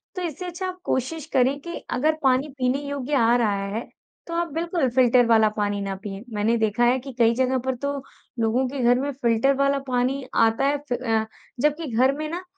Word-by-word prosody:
तो 365 Hz, -, -4 dB
इससे 340 Hz, +1 st, -4 dB
अच्छा 360 Hz, +1 st, -4 dB
आप 365 Hz, 0 st, -6 dB
कोशिश 290 Hz, +4 st, -2 dB
करें 265 Hz, +2 st, +3 dB
कि 340 Hz, +2 st, -6 dB
अगर 310 Hz, +5 st, +1 dB
पानी 265 Hz, +2 st, +3 dB
पीने 255 Hz, +2 st, +1 dB
योग्य 285 Hz, 0 st, -4 dB
आ 235 Hz, -1 st, +4 dB
रहा 205 Hz, -4 st, 0 dB
है, 230 Hz, -, -3 dB, 0.4 s
तो 335 Hz, -, -6 dB
आप 340 Hz, 0 st, 0 dB
बिल्कुल 330 Hz, -4 st, 0 dB
फिल्टर 245 Hz, 0 st, +4 dB
वाला 220 Hz, -2 st, +5 dB
पानी 205 Hz, -1 st, -1 dB
ना 195 Hz, -1 st, -3 dB
पिएँ। 200 Hz, 0 st, -6 dB
मैंने 215 Hz, +3 st, +1 dB
देखा 220 Hz, +1 st, +1 dB
है 245 Hz, +2 st, +4 dB
कि 270 Hz, +2 st, -8 dB
कई 230 Hz, 0 st, +5 dB
जगह 260 Hz, +1 st, +1 dB
पर 260 Hz, -1 st, 0 dB
तो 280 Hz, +3 st, -3 dB, 0.4 s
लोगों 230 Hz, +4 st, +1 dB
के 275 Hz, +2 st, -5 dB
घर 245 Hz, +1 st, +4 dB
में 285 Hz, +2 st, -2 dB
फिल्टर 245 Hz, 0 st, +2 dB
वाला 275 Hz, 0 st, +2 dB
पानी 255 Hz, +2 st, 0 dB
आता 225 Hz, +3 st, +3 dB
है 285 Hz, +1 st, +2 dB
फ -, -, +1 dB
अ, 225 Hz, -3 st, 0 dB, 0.4 s
जबकि 300 Hz, +2 st, +1 dB
घर 260 Hz, +3 st, +4 dB
में 310 Hz, 0 st, -3 dB
ना, 350 Hz, +3 st, -5 dB
260 Hz, 215 wpm, -24 LUFS, 230-285 Hz, 0.4 s, वाला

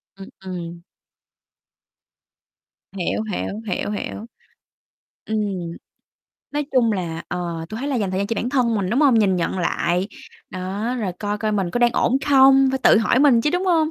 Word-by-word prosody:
Ừm, 195 Hz, 0 st, -11 dB, 0.2 s
ừm. 170 Hz, -2 st, -6 dB, 2.1 s
Hiểu, 190 Hz, +1 st, -2 dB
hiểu, 205 Hz, +3 st, -4 dB
hiểu, 195 Hz, +1 st, -2 dB
hiểu. 210 Hz, +1 st, -5 dB, 1.0 s
Ừm, 220 Hz, -, -2 dB, 1.2 s
nói 295 Hz, -1 st, -2 dB
chung 240 Hz, -4 st, +3 dB
là, 170 Hz, -4 st, -3 dB
ờ, 170 Hz, -2 st, -4 dB
tui 215 Hz, -, -6 dB
thấy 280 Hz, -, -3 dB
là 270 Hz, -, 0 dB
dành 200 Hz, -4 st, -1 dB
thời 185 Hz, -, -2 dB
gian 200 Hz, -, -1 dB
cho 230 Hz, -, -2 dB
bản 235 Hz, -, -2 dB
thân 245 Hz, -4 st, +1 dB
mình, 195 Hz, -3 st, -1 dB
đúng 245 Hz, +6 st, +2 dB
hông? 280 Hz, -5 st, +5 dB
Nhìn 195 Hz, -4 st, +3 dB
nhận 175 Hz, +2 st, -1 dB
lại, 175 Hz, +1 st, 0 dB, 0.4 s
đó, 195 Hz, +5 st, -3 dB
rồi 200 Hz, -6 st, -2 dB
coi 205 Hz, 0 st, -3 dB
coi 215 Hz, 0 st, -1 dB
mình 195 Hz, -4 st, -1 dB
có 245 Hz, -, -1 dB
đang 240 Hz, 0 st, +4 dB
ổn 255 Hz, -, +2 dB
không, 270 Hz, -1 st, +6 dB
phải 265 Hz, -, -1 dB
tự -, -, +6 dB
hỏi 225 Hz, +3 st, +2 dB
mình 265 Hz, -4 st, +5 dB
chứ, 295 Hz, -, +1 dB
đúng 360 Hz, +3 st, -1 dB
hông? 325 Hz, -3 st, +2 dB
210 Hz, 180 wpm, -21 LUFS, 185-255 Hz, 2.1 s, không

